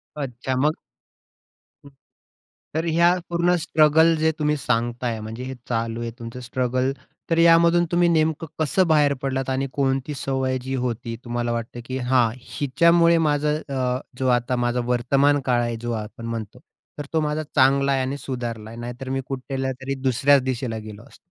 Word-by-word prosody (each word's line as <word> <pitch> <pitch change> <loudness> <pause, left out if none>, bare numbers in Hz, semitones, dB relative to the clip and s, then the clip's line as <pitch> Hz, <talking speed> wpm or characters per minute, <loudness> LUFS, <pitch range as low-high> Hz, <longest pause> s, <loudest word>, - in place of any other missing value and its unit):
अच्छा 130 -2 -4
मग 155 +1 +1 1.1
हं. - - -12 0.9
तर 160 +1 0
ह्या 170 +2 +4 0.2
पूर्ण 175 +1 +2
स्ट्रगल 160 +1 +4
जे 160 0 +3
तुम्ही 150 0 +1
सांगताय 120 -2 -1
म्हणजे 115 +3 -6
हे 130 +1 -5 0.2
चालू 115 -1 -2
आहे 115 0 -4
तुमचं 115 +1 -7
स्ट्रगल, 125 +1 -1 0.4
तर 165 - +2
यामधून 170 +1 +5
तुम्ही 175 0 +3
नेमकं 160 -1 +1
कसं 185 +4 +2
बाहेर 150 -3 +4
पडलात? 135 -1 -2
आणि 130 +1 -1
कोणती 135 +1 0
सवय 130 -1 -1
जी 130 +1 -5
होती 115 -1 -3
तुम्हाला 120 0 -2
वाटतं 115 +1 -4
की 130 +1 -4
हां, 125 -2 +2 0.3
हिच्यामुळे 170 +5 +4
माझं 150 +1 0
अ, 130 -1 -1 0.2
जो 130 - 0
आता 120 +1 -2
माझा 120 0 0
वर्तमानकाळ 125 +1 +2
आहे 120 -1 -2
जो 120 0 -3
आपण 115 +2 -10
म्हणतो, 115 -3 -5 0.4
तर 145 - -4
तो 160 - +3
माझा 150 +1 -1
चांगला 140 +1 +4
आहे 135 - +2
आणि 130 +2 -2
सुधारला 120 -5 -5
आहे. 115 - -9
नाहीतर 120 +2 -6
मी 135 0 -1
कुठल्यातरी 135 0 -3
दुसऱ्याच 135 +2 +4
दिशेला 125 -3 -2
गेलो 110 0 -9
असतो. - - -18
130 Hz, 165 wpm, -23 LUFS, 120-150 Hz, 1.1 s, यामधून